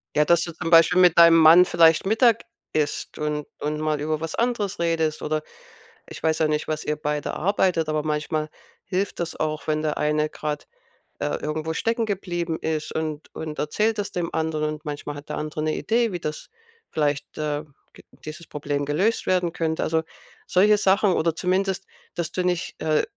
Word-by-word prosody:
Ja, 150 - +4
dass 170 +1 +4
du 170 - -4
zum 165 0 -4
Beispiel 165 +2 +6
mit 175 -2 +5
deinem 170 0 +8
Mann 165 +3 +8
vielleicht 165 +1 +4
Mittag 225 +2 +4 0.3
isst 150 -1 -2
und 150 -1 -2
und 150 +1 -2
mal 155 -1 0
über 155 +1 -1
was 165 - -4
anderes 220 -6 -1
redest 160 -2 0
oder 155 0 -1 0.7
ich - - -10
weiß 160 0 +1
ja 155 - +3
nicht, 150 0 -1
was 155 -1 -2
ihr 150 - -1
beide 150 -1 -2
arbeitet, 180 -3 +1
aber 155 -1 0
manchmal 155 0 -2 0.4
hilft 190 0 -2
das 170 -2 -3
auch, 155 0 -2
wenn 155 0 0
der 155 -1 -1
eine 150 0 +1
grade, 150 -1 -4 0.5
äh, 75 - -1
irgendwo 155 +1 -3
stecken 230 0 0
geblieben 175 -5 -3
ist 155 -1 -2
und 155 -1 -4
und 155 -1 -6
erzählt 210 +8 0
das 200 - -3
dem 175 -2 -3
anderen 155 -1 -1
und 155 +2 -13
manchmal 145 0 -5
hat 145 - -11
der - - -4
andere 155 0 -4
'ne 155 0 0
Idee, 230 -1 +1
wie 175 - -4
das 155 -1 -5 0.4
vielleicht 145 -2 -1
äh, 150 0 -2 0.6
dieses 155 +2 -8
Problem 145 -1 -3
gelöst 185 +11 0
werden 180 -2 +1
könnte. 160 -1 -2
Also 160 0 +1 0.4
solche 205 +3 +4
Sachen 195 0 +3
oder 165 -1 +1
zumindest, 190 +2 0 0.3
dass 170 -1 -3
du 185 - -1
nicht, 180 -1 -2
äh, 155 -1 +2
160 Hz, 185 wpm, -24 LUFS, 150-180 Hz, 0.7 s, deinem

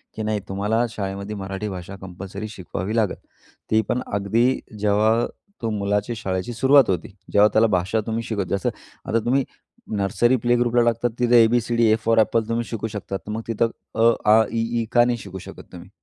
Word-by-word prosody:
की 110 - -4
नाही 110 -1 -1
तुम्हाला 105 +4 0
शाळेमध्ये 100 0 -5
मराठी 95 +1 -4
भाषा 95 0 -7
कंपल्सरी 95 +3 -7
शिकवावी 95 +1 -5
लागेल, 110 -4 +1 0.5
ती 110 0 +4
पण 125 - 0
अगदी 115 +6 +2 0.2
जेव्हा 105 +3 +2 0.4
तो 115 - -1
मुलाच्या 105 +2 -1
शाळेची 95 +2 -3
सुरुवात 135 +2 +5
होती. 95 +3 -1 0.2
जेव्हा 105 +1 +6
त्याला 110 +1 +5
भाषा 95 +5 -1
तुम्ही 115 +1 -2
शिकवता. 100 -4 -2
जसं 100 - -1 0.4
आता 115 - +2
तुम्ही 135 +3 +2 0.5
नर्सरी, 110 +6 +2
प्ले 120 0 +2
ग्रुपला 120 0 +2
टाकतात 120 +1 +1
तिथे 120 -1 +6
ए, - - +5
बी, 120 +1 +2
C, 120 +1 -3
D, 115 0 +4
A - - +5
for 115 0 +3
apple 110 0 +2
तुम्ही 115 +1 0
शिकू 110 -1 -4
शकतात, 100 -2 -5
तर - - -4
मग 110 +1 -3
तिथं 115 0 +1 0.3
अ, 115 +1 +5 0.2
आ, 110 +1 +7
इ, 115 - -1 0.2
ई - - -3
का 120 -1 +5
नाही 120 -1 0
शिकू 95 -2 -8
शकत - - -12
तुम्ही? 90 +1 -11
110 Hz, 200 wpm, -23 LUFS, 100-115 Hz, 0.5 s, आ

